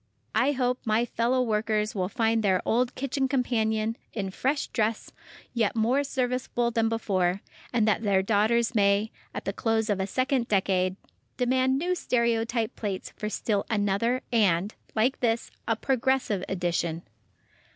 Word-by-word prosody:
I 255 +6 +3
hope 250 -1 0
my 225 +1 +2
fellow 240 +2 +1
workers 215 -1 0
will 185 -2 -1
find 225 +1 +1
their 190 -3 +2
old 245 +2 +1
kitchen 270 0 -1
companion, 225 -4 0 0.2
in 195 -3 -3
fresh 275 +8 0
dress, 220 -1 -1 0.4
yet 230 -3 +1
more 240 +6 +2
serviceable 250 -3 -1
than 225 -1 +1
before, 195 -4 0 0.3
and 225 -3 +2
that 215 0 +2
their 195 -3 +2
daughters 225 +4 +2
may, 205 0 +2 0.2
at - - -6
the - - -2
close 225 -1 0
of 200 - 0
a 190 - -1
second 255 +2 0
decade, 185 -2 +1 0.4
demand 260 +1 +2
new 350 +5 0
stereotype 235 -6 0
plates 200 -4 -4
for 210 - -4
still 210 -2 -1
another, 220 +4 +1
and, 200 -4 +2 0.2
like 235 +5 +2
this, 235 -1 0 0.2
a 225 - +2
progressive 260 -5 0
edition. 175 -2 -1
225 Hz, 150 wpm, -27 LUFS, 205-250 Hz, 0.4 s, I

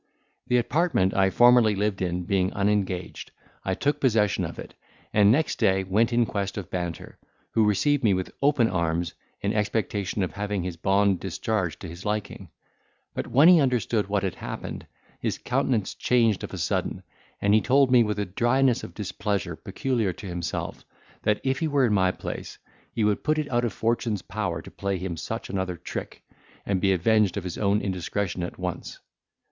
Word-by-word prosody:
The 125 - +3
apartment 125 - +1
I 95 0 +3
formerly 120 -1 +5
lived 100 -1 -1
in 90 0 -1
being 95 +1 +1
unengaged, 100 -3 -1 0.3
I - - -1
took 145 +1 0
possession 110 -7 +2
of - - -7
it, - - -9 0.4
and 105 -1 +6
next 155 +7 +1
day 95 0 +3
went 105 +6 +2
in 120 0 +3
quest 100 -2 -3
of 100 -5 -6
Banter, 85 -2 -5 0.3
who 110 -1 +3
received 145 +8 +2
me 105 -4 +4
with 95 0 -3
open 140 -4 +4
arms, 85 -2 -1 0.3
in 100 +2 0
expectation 105 -2 -1
of 90 - -2
having 105 -2 -3
his 90 -1 -4
bond 95 +2 +2
discharged 95 -2 -2
to 95 - -6
his 85 +3 -9
liking: 105 -1 -3 0.6
but - - -4
when 135 +7 +5
he 180 -2 +8
understood 120 -5 +1
what 100 -1 0
had 95 -3 -1
happened, - - -7 0.3
his - - -2
countenance 125 -5 0
changed 115 -5 +2
of - - -5
a - - -6
sudden, - - -2 0.4
and 100 0 +2
he 110 - +5
told 135 +2 +3
me, 125 -2 +7
with 105 -2 0
a 105 - -1
dryness 120 +6 +2
of - - -9
displeasure 100 -3 -2
peculiar 110 +2 -1
to 100 - -11
himself, 90 -2 -4 0.4
that, 105 -1 +1
if 130 0 0
he 160 - 0
were 140 -3 +3
in 110 - +1
my 95 -2 +3
place, - - -6 0.3
he 115 - -1
would 105 -1 +1
put 155 0 +1
it 150 -3 -2
out 120 0 +2
of 115 - -1
fortune's 115 -4 -1
power - - -3
to - - -11
play 100 -1 -2
him 90 -1 -4
such - - -5
another 95 -2 -3
trick, - - -7 0.4
and 95 -2 0
be 95 - +3
avenged 100 +1 +2
of 100 - -3
his 90 -2 -5
own 100 0 +2
indiscretion 95 0 -2
at 85 - -5
once. 90 -1 -5
105 Hz, 185 wpm, -26 LUFS, 95-120 Hz, 0.6 s, he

